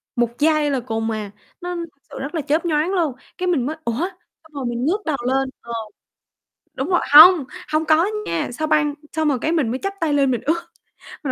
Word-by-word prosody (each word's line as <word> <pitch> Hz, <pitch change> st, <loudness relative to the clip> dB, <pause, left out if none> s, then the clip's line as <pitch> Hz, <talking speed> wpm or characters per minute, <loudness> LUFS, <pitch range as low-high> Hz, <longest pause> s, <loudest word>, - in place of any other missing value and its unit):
1 240 Hz, -1 st, +1 dB
giây 305 Hz, -1 st, +3 dB
là 270 Hz, -, 0 dB
cùng 225 Hz, -2 st, -3 dB
à, 210 Hz, -2 st, -4 dB, 0.3 s
nó 355 Hz, 0 st, -4 dB
thực 335 Hz, -5 st, -8 dB
sự -, -, -8 dB
rất 275 Hz, +5 st, -5 dB
là 320 Hz, -, 0 dB
chớp 305 Hz, +4 st, 0 dB
nhoáng 315 Hz, +2 st, +1 dB
luôn, 330 Hz, -7 st, +1 dB, 0.2 s
cái 365 Hz, -, -2 dB
mình 300 Hz, -9 st, +1 dB
mới: 310 Hz, -, -3 dB
"Ủa?", 235 Hz, +2 st, -1 dB, 0.4 s
xong 315 Hz, -1 st, -22 dB
rồi 275 Hz, -3 st, -4 dB
mình 240 Hz, +1 st, -2 dB
ngước 400 Hz, +7 st, 0 dB
đầu 300 Hz, -4 st, 0 dB
lên, 265 Hz, 0 st, +1 dB
ờ. 235 Hz, 0 st, -8 dB, 1.0 s
Đúng 270 Hz, +7 st, -3 dB
rồi 355 Hz, -, +3 dB
hông, 320 Hz, -1 st, +10 dB, 0.3 s
hông 310 Hz, +1 st, +2 dB
có 320 Hz, +3 st, +4 dB, 0.2 s
nha, 165 Hz, -, -2 dB
sao 310 Hz, +4 st, -2 dB
băng 300 Hz, -1 st, +2 dB, 0.2 s
xong 315 Hz, -1 st, 0 dB
rồi 270 Hz, -, +1 dB
cái 320 Hz, -, 0 dB
mình 310 Hz, -9 st, +1 dB
mới 255 Hz, -, -3 dB
chắp 395 Hz, 0 st, -2 dB
tay 320 Hz, -3 st, 0 dB
lên 275 Hz, -2 st, +3 dB
mình 245 Hz, -, -1 dB
ước, 335 Hz, +2 st, -1 dB, 0.5 s
mình 265 Hz, -, -1 dB
300 Hz, 230 wpm, -21 LUFS, 260-330 Hz, 1.0 s, hông